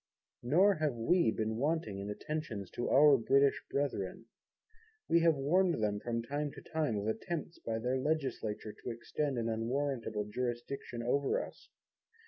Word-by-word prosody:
Nor 180 +11 +4
have 150 -4 0
We 140 +4 +3
been 110 0 -1
wanting 140 -7 -1
in 100 +1 -5
attention 140 -3 -4
to 120 - -2
our 145 +1 +7
Brittish 140 +4 +3
brethren. 120 -8 -2 0.8
We 170 - +5
have 165 -1 +4
warned 170 +6 +3
them 105 -2 0
from 115 +1 -2
time 145 +4 -2
to - - -10
time 150 -9 +1
of 100 - -2
attempts 165 +9 -3
by 110 -1 -3
their 125 +3 0
legislature 130 -8 -2
to - - -8
extend 120 +4 -2
an 115 -1 -1
unwarrantable 115 -1 -1
jurisdiction 120 +2 -4
over 140 +3 +1
us. - - -15
130 Hz, 150 wpm, -33 LUFS, 115-150 Hz, 0.8 s, our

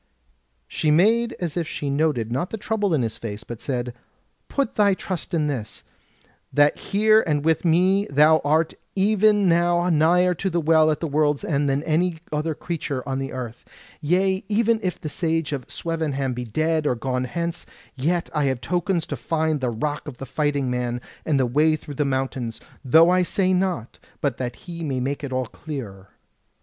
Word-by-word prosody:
She 155 - -1
made 225 +9 +3
as 170 -4 -3
if 170 -3 -1
she 145 -2 -3
noted 140 -6 0
not 135 +9 -1
the 225 - -4
trouble 205 -4 0
in 135 - +1
his 110 -1 -4
face, 110 -1 -6
but 120 -1 -8
said: 125 -3 -3 0.6
"Put 275 -4 -1
thy 200 -2 +3
trust 185 -3 -5
in 160 -3 +1
this, 125 -7 -4 0.7
that 145 0 +4
here 215 +2 +3
and 150 -1 0
with 160 0 +2
me 185 +4 +3
thou 150 +3 +5
art 155 +3 +2 0.2
even 205 0 +3
now 175 +1 +3
nigher 175 +3 +4
to 195 - 0
the 170 -1 0
Well 160 -1 +4
at 150 - -1
the 165 - -1
World's 150 -1 +1
End 145 -2 +1
than 135 +2 0
any 165 +2 +1
other 155 +1 -1
creature 145 -7 -4
on 135 0 -2
the 135 0 -4
earth. 125 -2 -6 0.4
Yea, 190 +5 +1
even 225 +1 +2
if 185 -3 -2
the - - -6
Sage 165 0 -1
of 135 -3 -4
Swevenham 150 -6 -2
be 125 0 -4
dead 155 +6 0
or 125 - +1
gone 125 +1 -2
hence, 170 +4 -4 0.3
yet 170 +6 0
have 150 -2 +1
I - - +3
tokens 175 +5 -1
to 145 - -4
find 155 +3 -1
the 125 - 0
Rock 145 +7 -3
of 135 -4 -7
the 135 - -7
Fighting 140 -1 -1
Man, 125 -1 -2 0.3
and 150 -4 +2
the 130 - +3
way 150 +6 +3
through 150 -1 -9
the 145 +1 0
mountains, 130 -3 -2 0.2
though 160 +6 +6
I 185 0 +4
say 185 +1 +1
not 180 - -1 0.2
but 140 -5 -1
that 125 -2 -4
he 170 -2 -6
may 135 -4 -2
make 140 +3 -3
it 140 - -4
all 130 0 -1
clearer. 115 - -8
155 Hz, 190 wpm, -23 LUFS, 135-175 Hz, 0.7 s, though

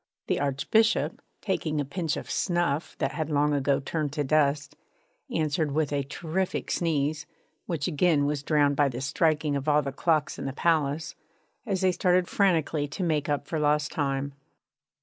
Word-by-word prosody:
The - - 0
Archbishop, 145 - +1 0.2
taking 160 -6 -1
a 145 - 0
pinch 160 +2 -2
of - - -6
snuff 170 -4 -1
that - - -1
had 155 -2 -3
long 150 0 +2
ago 140 0 +2
turned 145 +1 -2
to 150 -1 -1
dust, 145 0 +1 0.5
answered 155 -1 0
with 150 -1 0
a 140 - +1
terrific 165 +6 -3
sneeze, 150 -2 0 0.4
which 160 -5 -2
again 155 -3 +2
was 145 -1 -1
drowned 145 -1 +2
by 145 0 +3
the 120 -1 -5
striking 150 +1 +1
of 140 +2 -1
all 150 0 +4
the 140 - -3
clocks 155 +1 0
in - - -5
the 135 - -3
palace, 155 -1 0 0.5
as 195 -3 -1
they 185 -1 +4
started 180 0 +2
frantically 160 -6 +1
to 165 +6 -4
make 155 -3 0
up 145 -1 -1
for 160 - -3
lost 150 0 +1
time. 140 -3 -2
150 Hz, 170 wpm, -27 LUFS, 145-165 Hz, 0.5 s, all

